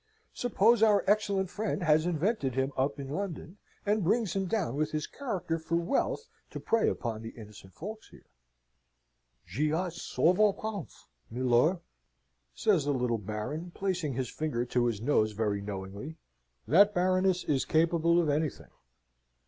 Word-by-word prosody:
Suppose 235 -1 +3
our 210 -3 +5
excellent 200 -2 +1
friend 210 -3 -2
has 155 0 +3
invented 165 - 0
him 135 +1 0
up 140 +2 0
in 140 - -5
London, 180 +1 -5 0.3
and 210 0 +1
brings 210 +1 +1
him 195 -1 0
down 185 - -1
with 155 +2 0
his 155 -1 -2
character 190 - -3
for 160 +1 -2
wealth 180 - 0 0.2
to - - -7
prey 230 -1 +2
upon 115 -3 -3
the 115 - -6
innocent 105 -4 -13
folks 215 +5 -8
here?" - - -17 1.2
"J'y 140 - -1
ai 180 +3 0
souvent 185 +4 +2
pense, 215 -7 -6 0.2
milor," 125 +8 +2 0.7
says 195 -10 +2
the 145 - +1
little 125 -3 0
Baron, 110 - -5
placing 180 -7 -1
his 130 0 -2
finger 125 -6 -2
to 120 0 +1
his 110 -3 -2
nose 110 -4 +2
very 105 -1 -1
knowingly, 100 +9 -6 0.5
"that 200 - +5
Baroness 185 0 +2
is 140 -3 +1
capable 170 +1 +3
of 170 - +1
anything." 150 +1 -2
160 Hz, 150 wpm, -30 LUFS, 125-195 Hz, 1.2 s, our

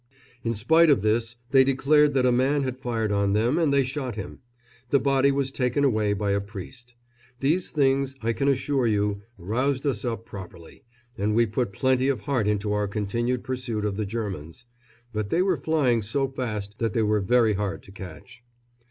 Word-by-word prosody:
In 115 0 -1
spite 160 +10 +4
of 135 -9 +4
this 115 +2 0 0.2
they 135 -1 +7
declared 140 +2 +3
that 130 -1 +3
a 125 - +4
man 135 +4 +2
had 130 -1 -4
fired 115 -4 -2
on 100 -1 +1
them, 120 +9 +2
and 160 -4 +2
they 140 -1 +4
shot 130 -3 -4
him. 100 -4 -7 0.5
The 140 - +4
body 135 +1 +3
was 135 -1 -1
taken 130 +1 0
away 110 -6 +2
by 100 0 -1
a 100 0 +1
priest. 115 +5 -10 0.4
These 160 +7 +1
things, 135 -2 +1
I 115 +1 +1
can 140 +4 -1
assure 135 -1 +1
you, 105 -2 0 0.2
roused 130 - -1
us 125 -8 -1
up 115 -2 -3
properly, 90 -5 -11 0.3
and 105 +2 +1
we 115 +1 +4
put 110 0 -2
plenty 130 +4 +1
of 135 -7 0
heart 125 -6 0
into 105 0 0
our 105 0 0
continued 115 +5 -2
pursuit 125 -5 -3
of 100 -2 -1
the 105 0 -2
Germans; 100 -2 -5 0.5
but 105 -1 -2
they 175 - +2
were 190 -2 +2
flying 135 -8 +2
so 135 +7 -1
fast 110 -6 -5
that 115 -2 -1
they 115 - +1
were 105 -1 +2
very 115 +2 +3
hard 100 0 -3
to - - -14
catch. 100 +7 -11
120 Hz, 195 wpm, -25 LUFS, 105-135 Hz, 0.5 s, they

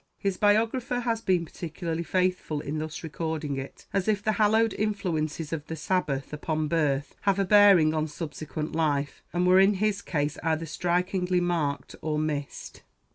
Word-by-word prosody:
His 195 -2 -1
biographer 230 +5 +2
has 230 -2 -1
been 180 -5 +1
particularly 165 0 -4
faithful 180 -3 0
in 145 +2 -4
thus 155 +1 -5
recording 160 -2 -3
it, 135 0 -8
as 195 0 0
if 205 -2 +1
the 215 - +2
hallowed 220 +1 +4
influences 165 -7 -2
of 155 -2 -4
the 160 - -4
Sabbath 150 -4 -1
upon 155 +1 -2
birth 145 -3 0
have 200 -1 +2
a 195 - +2
bearing 195 -6 +6
on 155 0 0
subsequent 155 0 -5
life, 145 -3 0
and 175 +1 +1
were 185 +1 +6
in 195 +2 +5
his 205 0 0
case 145 -2 -2
either 160 0 0
strikingly 180 +2 0
marked 165 -5 -1
or 155 -1 -1
missed. 150 -2 -4
165 Hz, 165 wpm, -27 LUFS, 155-195 Hz, -, bearing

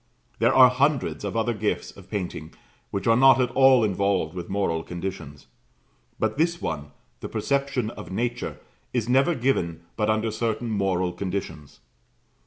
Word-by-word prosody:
There - - +4
are 130 -1 +8
hundreds 140 -1 0
of 100 +2 -3
other 115 +1 +1
gifts 105 -1 -2
of 95 -1 -15
painting 90 -6 -5 0.3
which 100 - -4
are 115 - +5
not 130 +1 +6
at 125 -1 +1
all 130 -3 +5
involved 100 -5 0
with 90 -2 -6
moral 95 -5 0
conditions, 85 -4 -7 0.7
but 110 +5 -1
this 170 +1 +1
one, 75 -2 -4 0.3
the - - -6
perception 135 -5 -1
of - - -10
nature, 120 +4 -3 0.4
is 115 -3 -1
never 135 +7 +3
given 115 -11 0
but 105 -1 0
under 110 +1 +1
certain 110 +1 -2
moral 95 -3 0
conditions. 90 -9 -5
110 Hz, 155 wpm, -25 LUFS, 95-125 Hz, 0.7 s, are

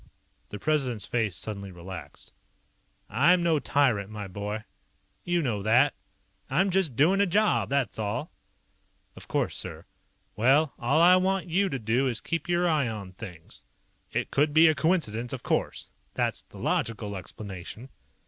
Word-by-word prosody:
The 105 - -6
President's 130 -4 0
face 110 -8 -1
suddenly 100 -2 -5
relaxed. 90 -3 -10 0.7
"I'm 170 - +4
no 165 -3 +3
tyrant, 120 -10 +1
my 105 -2 -6
boy. 105 +3 -5 0.6
You 175 -1 0
know 110 -7 -1
that. 120 +7 +4 0.6
I'm 185 +8 +2
just 180 -9 +1
doing 180 - +4
a 200 - +3
job, 210 +4 +2
that's 140 -4 0
all." 105 -1 -3 0.8
"Of - - -12
course, - - -1
sir - - -7 0.2
" - - -42
"Well, 135 +7 +3
all 135 +6 +2
I 180 +2 +7
want 190 0 0
you 195 +4 +2
to 135 - -2
do 120 +3 +1
is 120 -3 -2
keep 165 +1 -3
your 175 0 +2
eye 155 -6 +2
on 105 -4 -6
things. 90 -5 -10 0.5
It - - -2
could 145 +2 +2
be 160 +1 +8
a 155 - +5
coincidence 135 - 0
of 130 - -6
course. - - -2 0.2
That's - - -1
the - - -16
logical 105 -3 -1
explanation." 100 +5 -8
130 Hz, 160 wpm, -27 LUFS, 105-165 Hz, 0.8 s, be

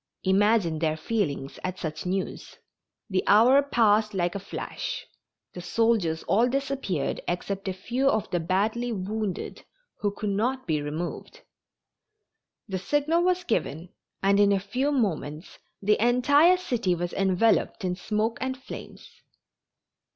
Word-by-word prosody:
Imagine 195 -4 +3
their 155 -1 0
feelings 155 -8 -2
at 185 0 -3
such 160 +1 -5
news. 190 +1 -4 0.5
The 190 -4 0
hour 240 +7 +6
passed 220 -6 +2
like 175 -1 0
a 200 - -3
flash. - - -5 0.5
The 180 - -7
soldiers 180 -4 +1
all 230 +5 +3
disappeared 270 - -2
except 195 +3 -3
a 190 - -1
few 245 +8 0
of 220 - 0
the 175 - +1
badly 210 +8 0
wounded, 210 -1 -4 0.4
who 205 - +1
could 200 0 -3
not 250 +6 -1
be 155 -4 0
removed. 170 - -5 1.3
The 190 -3 -3
signal 290 - +1
was 365 0 +1
given 170 - -2 0.3
and 200 +1 +4
in 205 0 +5
a 200 - +3
few 250 +9 -1
moments 170 - -2 0.2
the 210 +2 +3
entire 285 +9 +5
city 240 - 0
was 175 +1 -4
enveloped 195 +2 +2
in 180 -1 -1
smoke 215 +5 -1
and 260 0 -2
flames. 260 - -10
205 Hz, 135 wpm, -26 LUFS, 180-245 Hz, 1.3 s, hour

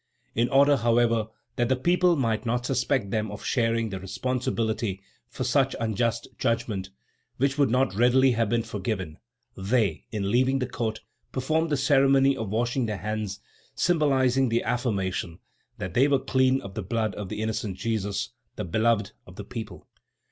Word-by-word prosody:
In 120 +2 +1
order, 140 +2 +5
however, 115 -1 +2 0.3
that 120 0 +1
the 130 - +3
people 175 +6 +3
might 115 -6 0
not 120 +1 -1
suspect 125 -4 0
them 110 0 -1
of 105 - -8
sharing 115 -2 +1
the 95 -2 -5
responsibility 110 -1 -2 0.3
for - - -4
such - - +2
unjust 115 +1 -1
judgment, 115 -5 -1 0.5
which 135 +1 +1
would 140 - +4
not 125 -3 +2
readily 125 +5 +4
have 115 -3 +1
been 115 0 +1
forgiven, 95 -7 -4 0.4
they, 100 -3 0
in 100 -2 -2
leaving 130 +2 +3
the 130 - -1
court, 115 -3 -3 0.3
performed 160 +5 0
the 145 - +1
ceremony 135 0 +4
of 110 -3 -4
washing 120 +3 0
their 105 -2 -2
hands, 105 +1 -4 0.3
symbolizing 135 -6 +2
the 115 +1 +1
affirmation 95 -8 -1 0.4
that 90 -2 -5
they 130 +6 +4
were 140 -1 +3
clean 130 0 +2
of 100 - -9
the 110 - -4
blood 110 +2 -1
of 100 0 -6
the - - -5
innocent 110 -3 -2
Jesus, 105 -3 -2 0.3
the - - -4
beloved 110 +2 +1 0.2
of - - -13
the - - -8
people. - - -7
115 Hz, 165 wpm, -26 LUFS, 105-130 Hz, 0.5 s, order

